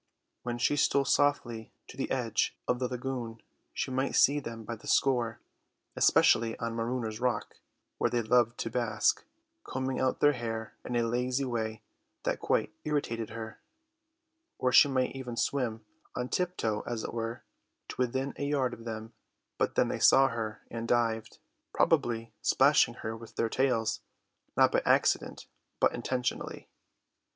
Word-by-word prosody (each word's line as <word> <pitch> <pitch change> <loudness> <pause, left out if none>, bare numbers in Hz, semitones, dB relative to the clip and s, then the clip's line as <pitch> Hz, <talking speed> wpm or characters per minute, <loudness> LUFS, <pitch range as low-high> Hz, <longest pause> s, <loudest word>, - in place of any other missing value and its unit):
When 120 -1 -3
she 135 +4 +1
stole 140 -1 +3
softly 125 -6 +1 0.2
to - - -11
the - - -3
edge - - 0
of 125 - +1
the 125 - 0
lagoon 125 -2 -5 0.3
she - - -3
might 130 +1 0
see 145 +2 +5
them 115 -4 -7
by 115 +2 -5
the 110 - -14
score, 120 -4 +2 0.6
especially 115 0 +4
on 115 0 -3
Marooners' 115 -1 -2
Rock, 125 -1 -1 0.4
where - - +2
they 120 -1 0
loved 120 +1 +3
to 115 - -3
bask, 110 -3 +1 0.4
combing 130 0 -3
out 130 0 +1
their 145 0 +5
hair 115 -3 -4
in 125 - -4
a 120 - +2
lazy 125 +3 0
way 110 -3 -3 0.4
that - - -1
quite - - 0
irritated 120 -7 -2
her; 110 -1 -8 1.0
or 125 - +1
she 145 - +8
might 130 -1 0
even 125 -3 -6
swim, 115 -6 -1 0.3
on 125 0 -3
tiptoe 175 -13 -1
as 115 -2 -3
it - - -5
were, 115 0 -4 0.5
to - - -6
within 130 +2 0
a 140 - -2
yard 135 -4 +1
of 115 - -10
them, 110 0 -6 0.5
but - - 0
then - - +3
they - - -2
saw 135 0 +6
her 110 -2 -4
and 115 0 -4
dived, 115 -2 0 0.4
probably 115 -1 +1
splashing 135 -3 +4
her 110 0 -2
with 115 0 -12
their 115 - 0
tails, 120 -4 +1 0.6
not - - +6
by - - +2
accident, - - +2 0.3
but - - +3
intentionally. 125 -1 -3
120 Hz, 160 wpm, -30 LUFS, 115-130 Hz, 1.0 s, she